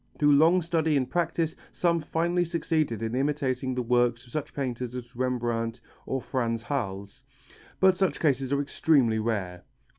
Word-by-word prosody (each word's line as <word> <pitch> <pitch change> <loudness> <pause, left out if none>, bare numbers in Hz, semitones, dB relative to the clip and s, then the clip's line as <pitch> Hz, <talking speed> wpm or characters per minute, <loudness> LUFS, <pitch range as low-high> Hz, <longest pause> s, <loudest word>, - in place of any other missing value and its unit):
Through 145 -1 +4
long 165 +5 +5
study 160 -2 +1
and 130 -2 0
practice 165 -2 -1 0.2
some 170 -2 +1
finally 170 +3 0
succeed 165 -4 0
in 115 0 -3
imitating 130 -1 -1
the 125 - -1
work 120 0 +3
of 115 - -20
such 155 +1 -4
painters 125 -3 -4
as 120 -2 -8
Rembrandt 120 -2 -1 0.3
or 135 - -1
Frans 115 -3 -2
Hals, 100 -8 -4 0.6
but 190 -1 +5
such 190 0 0
cases 135 -4 +1
are 140 0 +2
extremely 135 -6 +2
rare. 100 -6 -2
130 Hz, 155 wpm, -27 LUFS, 120-160 Hz, 0.6 s, long